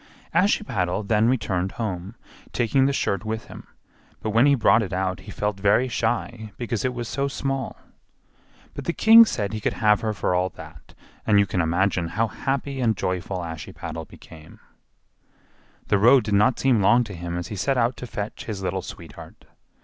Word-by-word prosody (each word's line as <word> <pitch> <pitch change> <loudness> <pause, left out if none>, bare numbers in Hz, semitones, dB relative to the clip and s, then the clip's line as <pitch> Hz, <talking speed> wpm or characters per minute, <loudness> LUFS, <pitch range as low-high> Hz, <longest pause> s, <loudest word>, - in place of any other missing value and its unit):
Ashiepattle 105 - +1
then 110 +1 +3
returned 95 -7 -1
home, 100 -2 -5 0.4
taking 130 +3 +2
the - - +1
shirt 100 -7 -1
with 110 0 -4
him; - - -12 0.5
but 110 - -3
when 115 +6 +4
he 140 - +5
brought 110 -2 +4
it 95 -5 -4
out 95 -1 -1
he 105 - -11
felt 105 -1 -3
very 105 +6 +3
shy 115 -2 -2
because 120 -3 -3
it 125 -1 -1
was 120 -1 -4
so 140 +3 -1
small. 135 -1 -3 1.0
But - - -7
the 170 - -1
king 225 +3 +8
said 105 - -3
he 110 - -3
could - - 0
have 105 -1 +3
her 110 - -1
for 105 -3 -1
all 90 +1 +1
that, - - -13 0.3
and 105 -2 +4
you 100 - +5
can 90 -1 -1
imagine 85 +1 0
how 110 +7 0
happy 135 +4 -3
and 110 -4 +1
joyful 90 0 -3
Ashiepattle 80 -2 -7
became. 80 -1 -15 1.3
The 100 - +3
road 125 +4 +6
did 105 -1 -3
not 105 +5 +3
seem 125 -5 +3
long 120 +5 +4
to 105 -4 -9
him 85 0 -5
as 85 - -5
he 105 - -5
set 135 +8 0
out 120 +1 +1
to 125 - -7
fetch 105 -1 -6
his 100 -4 -5
little 95 +1 -2
sweetheart. 85 -4 -11
105 Hz, 190 wpm, -24 LUFS, 95-120 Hz, 1.3 s, king